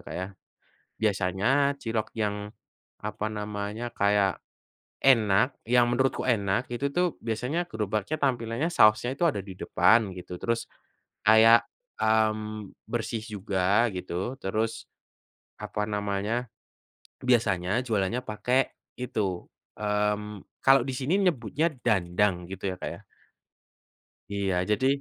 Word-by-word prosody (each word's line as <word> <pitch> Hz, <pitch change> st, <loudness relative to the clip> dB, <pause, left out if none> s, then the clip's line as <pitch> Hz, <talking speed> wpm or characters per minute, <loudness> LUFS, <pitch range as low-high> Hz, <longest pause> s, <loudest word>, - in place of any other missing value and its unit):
Kak, -, -, -9 dB
ya. 95 Hz, +1 st, -3 dB, 0.7 s
Biasanya 105 Hz, +8 st, +2 dB
cilok 110 Hz, -1 st, -2 dB
yang, 105 Hz, -1 st, -2 dB, 0.5 s
apa 105 Hz, -, -4 dB
namanya, 105 Hz, +2 st, -4 dB
kayak 100 Hz, -1 st, +3 dB, 0.6 s
enak, 120 Hz, -1 st, +4 dB
yang 120 Hz, +1 st, +4 dB
menurutku 130 Hz, +2 st, +1 dB
enak 100 Hz, 0 st, +1 dB
itu 135 Hz, +4 st, -2 dB
tuh 180 Hz, 0 st, +1 dB
biasanya 125 Hz, +10 st, -1 dB
gerobaknya 110 Hz, +5 st, -2 dB
tampilannya 120 Hz, +1 st, 0 dB
sausnya 110 Hz, +4 st, +5 dB
itu 175 Hz, -, -6 dB
ada 145 Hz, -11 st, +2 dB
di 95 Hz, -1 st, -9 dB
depan 110 Hz, 0 st, +3 dB
gitu, 90 Hz, -, -8 dB
terus 115 Hz, -1 st, -1 dB, 0.6 s
kayak, 110 Hz, +2 st, +7 dB, 0.4 s
mmm, 110 Hz, -1 st, +1 dB, 0.2 s
bersih 115 Hz, -1 st, -2 dB
juga 100 Hz, +1 st, +1 dB
gitu, 90 Hz, +6 st, -3 dB
terus 110 Hz, +3 st, -2 dB, 0.7 s
apa 105 Hz, -, -3 dB
namanya, 105 Hz, +3 st, -2 dB, 0.7 s
biasanya 110 Hz, -4 st, +2 dB
jualannya 110 Hz, +1 st, 0 dB
pakai 125 Hz, +4 st, 0 dB, 0.3 s
itu, 100 Hz, -7 st, -2 dB, 0.3 s
mmm, 105 Hz, 0 st, -1 dB, 0.2 s
kalau 135 Hz, 0 st, +7 dB
di 130 Hz, -, -2 dB
sini 155 Hz, +10 st, +1 dB
nyebutnya 165 Hz, -2 st, +1 dB, 0.2 s
dandang 90 Hz, -3 st, +1 dB
gitu 95 Hz, 0 st, -3 dB
ya, -, -, -7 dB
Kak, -, -, -3 dB
ya. -, -, -8 dB, 1.3 s
Iya 100 Hz, -2 st, 0 dB, 0.2 s
jadi, 120 Hz, +5 st, +2 dB
110 Hz, 115 wpm, -27 LUFS, 100-120 Hz, 1.3 s, kayak